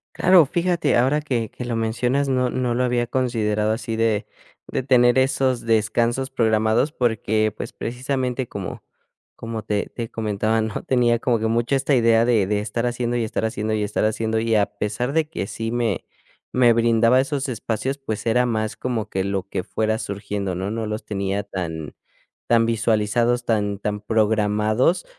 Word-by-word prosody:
Claro, 180 -3 +6
fíjate 175 +4 +1
ahora 135 +5 +2
que 120 -7 -2
que - - -8
lo 120 -2 -2
mencionas, 120 +5 0
no 130 -2 +1
no 125 -1 -1
lo 125 +2 +1
había 120 -1 0
considerado 110 -5 0
así 115 0 -3
de 110 -2 0 0.4
de - - -2
tener 125 -1 +4
esos 130 -1 +2
descansos 115 +3 +1
programados 110 +2 +2
porque 110 -5 0
pues, - - -6
precisamente 130 +1 -3
como 100 -3 -6 0.5
como 115 -1 -5
te 105 -1 -1
te 115 -2 -4
comentaba, 110 0 0
¿no? 110 -1 -3
Tenía 120 -2 +2
como 120 -1 +1
que 110 - 0
mucho 120 +4 +1
esta 135 +1 +1
idea 115 -1 +4
de 115 -5 +3
de 105 0 0
estar 110 +3 -2
haciendo 120 0 -2
y 120 - 0
estar 110 0 -2
haciendo 110 0 -2
y 105 -1 0
estar 105 0 -1
haciendo 110 +1 0
y 115 0 0
a 105 -1 +4
pesar 110 +6 -2
de 160 -1 +1
que 100 - -4
sí 115 +2 -4
me 115 -5 -1 0.5
me 120 -2 +5
brindaba 115 +2 +4
esos 140 0 -2
espacios, 115 +3 -3
pues 110 -6 -5
era 120 +2 +3
más 110 -2 -1
como 115 -4 -3
que 95 -2 -1
lo 95 -1 -2
que 95 -2 -3
fuera 110 +3 -1
surgiendo, 100 -2 -4
¿no? 95 +3 -3
No 110 0 -3
los 105 0 -4
tenía 100 0 -2
tan 80 -6 -5 0.5
tan 115 -1 +4
visualizados, 115 +2 +1
tan 105 -3 0
tan 105 +1 -3
programados, 110 - +1
115 Hz, 175 wpm, -22 LUFS, 105-125 Hz, 0.5 s, Claro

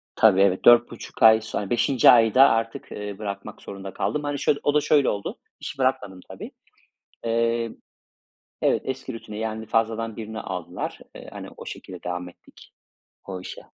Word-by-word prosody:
Tabii, 100 -3 +5
evet, 95 -1 +2
4,5 120 -1 +4
ay 110 0 +8
sonra 105 -2 -4
5'inci 120 +1 +4
ayda 120 +3 +7
artık, 115 0 -2
eee, 105 -1 -6
bırakmak 100 0 -6
zorunda 95 0 -8
kaldım. 150 - -2
Hani 145 -1 -3
şöyle, 145 - +1
o 145 - +2
da 150 - +3
şöyle 145 -2 +3
oldu: 100 -1 -4 0.2
İşi - - -7
bırakmadım 130 -8 -1
tabii; - - -9 0.7
eee, 115 0 0 0.9
evet, - - +2
eski 130 0 -5
rutine, 105 -2 -8
yani 110 0 -4
fazladan 115 0 -1
birini 110 -1 -6
aldılar. 90 -2 -5 0.2
Eee, - - -11
hani - - -8
o - - -10
şekilde 90 -2 -9
devam 90 0 -4
ettik 90 - -19 0.5
o 95 -2 -6
işe. - - -8
110 Hz, 160 wpm, -24 LUFS, 100-120 Hz, 0.9 s, ay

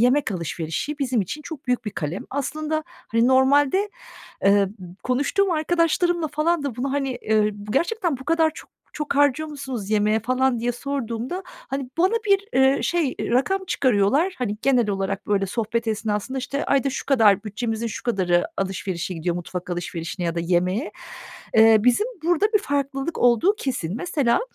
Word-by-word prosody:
yemek 255 +2 +3
alışverişi 170 - -3
bizim 255 -5 +1
için 295 - -4
çok 295 -3 -9
büyük 250 -1 0
bir 210 - -3
kalem. 165 0 -4
Aslında, 310 +3 -2
hani, 235 -9 -1
normalde, 280 +9 +4 0.5
eee, 200 0 +5 0.3
konuştuğum 285 +10 +1
arkadaşlarımla 335 0 +1
falan 315 +2 0
da 275 -5 -4
bunu, 270 +2 -2
hani, 275 -3 -1
ııı, 215 -1 +4 0.2
"Gerçekten 340 - 0
bu 265 - -10
kadar 325 +1 +3
çok - - -12 0.2
çok 300 -1 -3
harcıyor 290 +2 +3
musunuz 265 -8 -6
yemeğe?" 215 +1 +2
falan 255 +2 +1
diye 240 +1 0
sorduğumda, 260 - -4
hani, 275 - -6
bana 370 +4 +4
bir, 400 0 +3
eee, 265 +1 +4
şey, 335 -6 0
ııı, - - -2
rakam 275 +11 +2
çıkarıyorlar. 265 - +2
Hani, 210 -5 -2
genel 250 -5 +3
olarak, 195 +1 -2
böyle, 200 -1 +1
sohbet 230 +3 -2
esnasında, 220 +3 -2
işte, 275 +3 -3
ayda 275 0 +2
şu - - -5
kadar 220 -7 +4
bütçemizin 225 +2 -3
şu 225 - -5
kadarı 180 -7 +1
alışverişe 190 -2 -3
gidiyor, 170 +1 -2
mutfak 180 +1 -6
alışverişine 175 0 -4
ya 165 - -1
da 170 - -1
yemeğe. 180 - 0 0.6
Eee, 220 0 +7
bizim 250 - +3 0.2
burada 350 +4 +3
bir - - +7
farklılık 280 -2 -2
olduğu 245 - +4
kesin. 205 - -3
Mesela, 275 -5 +1
255 Hz, 160 wpm, -23 LUFS, 210-295 Hz, 0.6 s, Eee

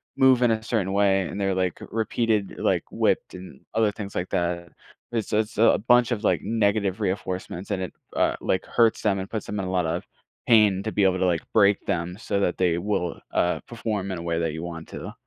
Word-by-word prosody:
move 130 -2 +5
in 120 -2 +4
a 110 -1 -1
certain 105 -4 -1
way, 100 -1 +3
and - - -6
they're, 95 -1 +1
like, 95 -1 0
repeated, 110 -2 0
like, - - +1
whipped - - 0
and 90 0 -10
other 110 -1 +2
things 100 -1 -8
like 90 - -2
that. 85 0 -1 0.4
It's 115 -3 -2
it's 110 0 0
a 115 - +6
bunch 120 -1 +5
of, 115 -2 -1
like, - - +2
negative 100 -3 0
reinforcements 95 -1 -3
and 95 -3 -1
it, 90 - -6 0.2
uh, - - +2
like, 95 - 0
hurts 115 -2 +2
them 100 -2 +1
and 95 - -5
puts 110 -3 -4
them 105 - -4
in 95 - -2
a - - -4
lot 90 -2 +1
of 80 +2 -2 0.4
pain 105 -4 +5
to 110 - -3
be 105 - +1
able 95 -1 +2
to, 95 - +2
like, 85 -2 +2
break 100 -2 +4
them 90 +2 -2
so 100 - -1
that 90 - 0
they 90 -2 +2
will, 90 -2 -1
uh, 90 - +1
perform 105 -4 -3
in 95 - -3
a - - -6
way 85 -1 -1
that 80 -1 0
you 80 - -5
want 80 -2 -7
to. - - -7
100 Hz, 230 wpm, -25 LUFS, 90-110 Hz, 0.4 s, a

